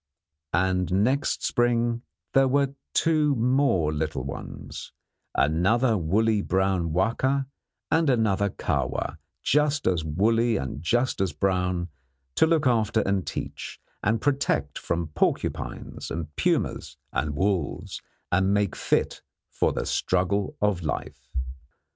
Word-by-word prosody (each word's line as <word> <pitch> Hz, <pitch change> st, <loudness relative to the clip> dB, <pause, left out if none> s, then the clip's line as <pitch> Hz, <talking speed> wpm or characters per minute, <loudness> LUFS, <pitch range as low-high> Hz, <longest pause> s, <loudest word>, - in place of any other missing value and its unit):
And 90 Hz, +1 st, +1 dB
next 135 Hz, +5 st, 0 dB
spring 120 Hz, -1 st, +1 dB, 0.3 s
there 135 Hz, 0 st, +5 dB
were 140 Hz, +1 st, +2 dB, 0.2 s
two 155 Hz, -3 st, +3 dB
more 120 Hz, -, +2 dB
little 75 Hz, -3 st, -2 dB
ones 70 Hz, +1 st, -7 dB, 0.4 s
another 100 Hz, -, +3 dB
woolly 105 Hz, +5 st, +2 dB
brown 95 Hz, -3 st, +1 dB
Wahka, 125 Hz, -, +1 dB, 0.5 s
and 160 Hz, -1 st, +3 dB
another 105 Hz, -5 st, +2 dB
Kahwa, -, -, -2 dB, 0.2 s
just 150 Hz, 0 st, +2 dB
as 85 Hz, -4 st, +2 dB
woolly 110 Hz, +8 st, +2 dB
and 65 Hz, +1 st, -4 dB
just 120 Hz, +7 st, +1 dB
as 95 Hz, -5 st, 0 dB
brown 90 Hz, -2 st, 0 dB, 0.4 s
to 160 Hz, -, +4 dB
look 160 Hz, -2 st, +2 dB
after 115 Hz, -3 st, +2 dB
and 100 Hz, -2 st, 0 dB
teach, -, -, -5 dB, 0.2 s
and 110 Hz, +1 st, +1 dB
protect 140 Hz, +1 st, 0 dB
from 85 Hz, -2 st, -2 dB
porcupines 75 Hz, -, -2 dB
and 75 Hz, -2 st, -5 dB
pumas -, -, 0 dB, 0.2 s
and 75 Hz, +3 st, -1 dB
wolves, 95 Hz, 0 st, -1 dB, 0.3 s
and 95 Hz, +2 st, +3 dB
make 100 Hz, -1 st, +1 dB
fit -, -, 0 dB, 0.3 s
for -, -, +1 dB
the -, -, -3 dB
struggle 95 Hz, +2 st, 0 dB
of 105 Hz, -4 st, +1 dB
life. 75 Hz, -4 st, -5 dB
100 Hz, 120 wpm, -26 LUFS, 85-120 Hz, 0.5 s, there